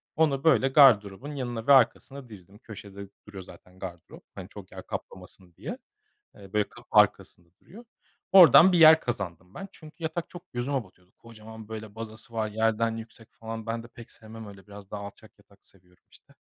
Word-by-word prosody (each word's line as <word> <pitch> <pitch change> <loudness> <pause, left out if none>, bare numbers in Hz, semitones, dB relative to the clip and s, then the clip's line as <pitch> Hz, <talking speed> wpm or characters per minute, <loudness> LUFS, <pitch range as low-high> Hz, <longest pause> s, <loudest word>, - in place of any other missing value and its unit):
Onu 145 -4 +1
böyle 135 -5 +4
gardırobun 130 -3 +4
yanına 120 -4 -5
ve 140 - +7
arkasına 135 +1 +1
dizdim 100 -1 -15
köşede 100 -3 -11 0.2
duruyor 100 -3 -10
zaten 90 0 -17
gardırop. 90 -3 -10
Hani - - -9
çok - - -13
yer - - -10
kaplamasın 90 -1 -10
diye. - - -7 0.6
Eee, 100 -1 -15
böyle 105 -1 0
kapı - - -16
arkasında 85 -1 +1
duruyor. 230 +6 -15 0.5
Oradan 190 -1 +8
bir 175 - +2
yer 160 0 +8
kazandım 95 -6 -6
ben. 195 - -8
Çünkü 160 0 -15
yatak 160 +1 -4
çok 175 -6 -14
gözüme 130 +1 -2
batıyordu. 90 -1 -25
Kocaman 110 -1 -13
böyle 110 -1 -9
bazası 115 +2 -10
var, 110 -1 -2
yerden 110 +1 0
yüksek 115 0 -13
falan. 115 0 -8
Ben 115 0 -4
de - - -12
pek 120 -1 -15
sevmem 110 0 -12
öyle 100 0 -14
biraz 100 -1 -13
daha 105 - -6
alçak 100 +2 -13
yatak 100 -1 -25
seviyorum, 90 -2 -23
işte. - - -21
110 Hz, 180 wpm, -26 LUFS, 100-130 Hz, 0.6 s, Oradan